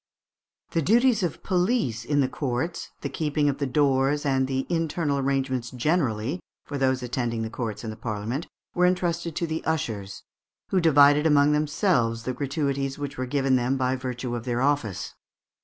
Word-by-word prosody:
The 165 - +1
duties 235 - +4
of 175 -5 -3
police 180 - +1
in 145 +1 +2
the 130 - +2
courts, 135 +4 -3
the - - -2
keeping 150 +1 0
of 140 - -2
the 140 - 0
doors, 140 +1 +2
and 135 -1 +2
the 130 0 -1
internal 165 -3 0
arrangements 135 -3 -1
generally 130 0 0 0.3
for 145 -1 -4
those 130 -1 +1
attending 120 -2 -2
the 110 - -4
courts 115 -3 -4
and 110 -1 -4
the - - -13
Parliament, 115 +6 -3 0.3
were 180 0 +4
entrusted 170 -2 -1
to 170 - 0
the 160 0 -3
ushers, 110 -11 -3 0.5
"who 185 - +2
divided 145 -1 +6
among 145 -1 +5
themselves 150 - +1
the 130 - -2
gratuities 140 0 -2
which 145 -3 -5
were 130 - -2
given 135 0 +2
them 125 +2 0
by 130 0 +1
virtue 125 -1 -4
of 120 - -4
their 120 -1 -1
office." 135 -10 -1
140 Hz, 175 wpm, -26 LUFS, 125-155 Hz, 0.5 s, divided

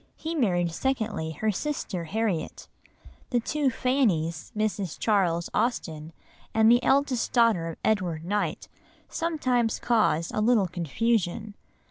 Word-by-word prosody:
He 320 +1 -5
married 180 - +1
secondly 215 -7 -2
her 215 +8 0
sister 200 - -3
Harriet. 195 -2 -2 0.6
The 245 - +2
two 290 +4 0
Fannies, 205 - 0
Mrs. 205 -5 -1
Charles 180 -6 +1
Austen 160 -10 -2 0.4
and 220 +1 +6
the 240 +1 +5
eldest 265 -1 +1
daughter 230 -9 +3
of 165 - -6
Edward 175 -7 0
Knight, 205 +3 -2 0.4
sometimes 255 -9 0
cause 215 -8 +1
a 215 - 0
little 220 -2 +4
confusion. 200 +4 -1
215 Hz, 120 wpm, -27 LUFS, 170-245 Hz, 0.6 s, and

